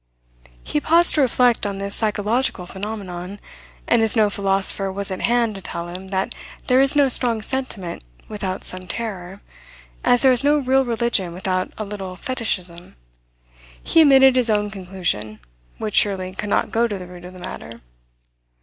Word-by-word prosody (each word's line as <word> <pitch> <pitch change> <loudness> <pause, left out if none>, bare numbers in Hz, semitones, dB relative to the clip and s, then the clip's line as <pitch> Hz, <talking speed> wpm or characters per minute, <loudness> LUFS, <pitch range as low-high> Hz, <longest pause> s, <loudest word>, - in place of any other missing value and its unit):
He 105 - -1
paused 340 +2 +4
to 300 - +2
reflect 250 -2 +3
on 200 -1 -4
this 200 0 -4
psychological 215 -1 -1
phenomenon, 190 -1 -7 0.5
and - - +3
as 225 +2 +3
no 215 -2 +3
philosopher 195 0 +1
was 200 0 -3
at 185 - -4
hand 235 -2 +1
to 195 - -6
tell 170 -1 -5
him 185 +2 -8
that 190 +4 -2 0.3
there 255 +1 +4
is 275 +1 +3
no 285 -1 +5
strong 240 -4 +1
sentiment 220 - -4 0.2
without 195 -3 -4
some 185 0 -1
terror, 195 -3 -5 0.6
as 245 0 +3
there 265 - +6
is 250 +1 +3
no 295 +1 +4
real 265 -1 +2
religion 230 -7 0
without 185 +1 -2
a 215 - -4
little 195 -2 -6
fetishism, 185 - -2 0.9
he 330 - +4
emitted 270 -3 +6
his 250 -2 +3
own 210 -1 +1
conclusion, 180 - -4 0.4
which 215 -1 -2
surely 185 -2 +3
could 205 +2 -5
not - - 0
go 235 +1 +2
to 205 -3 -4
the 180 - -8
root 180 0 -12
of 180 +1 -10
the - - -12
matter. 115 -9 -9
205 Hz, 170 wpm, -21 LUFS, 185-240 Hz, 0.9 s, there